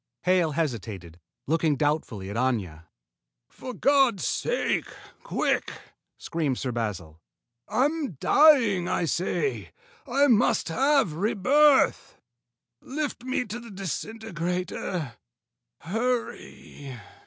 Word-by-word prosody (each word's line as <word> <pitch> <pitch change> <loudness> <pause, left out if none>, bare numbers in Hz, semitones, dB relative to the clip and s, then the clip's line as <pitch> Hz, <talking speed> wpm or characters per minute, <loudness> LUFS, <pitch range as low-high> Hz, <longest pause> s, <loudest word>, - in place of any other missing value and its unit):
Hale 180 -4 +2
hesitated, 105 - -4 0.3
looking 160 0 +1
doubtfully 135 -10 -2
at - - -6
Aña. 105 -10 -1 0.6
"For 255 - -8
God's 265 -3 +2
sake, - - -1 0.3
quick!" - - -1 0.5
screamed 150 -6 -2
Sir 130 - -3
Basil. 95 -9 -4 0.5
"I'm 280 - 0
dying, 230 - +4
I 175 - 0
say! 185 - -2 0.4
I 275 +3 +3
must 230 -8 +3
have 270 - +2
rebirth. 255 - +3 0.6
Lift 285 -3 -4
me 255 -1 -1
to 220 +3 -6
the 235 -1 -11
disintegrator. 180 - -4 0.6
Hurry!..." 220 - -4
180 Hz, 95 wpm, -26 LUFS, -, 0.6 s, dying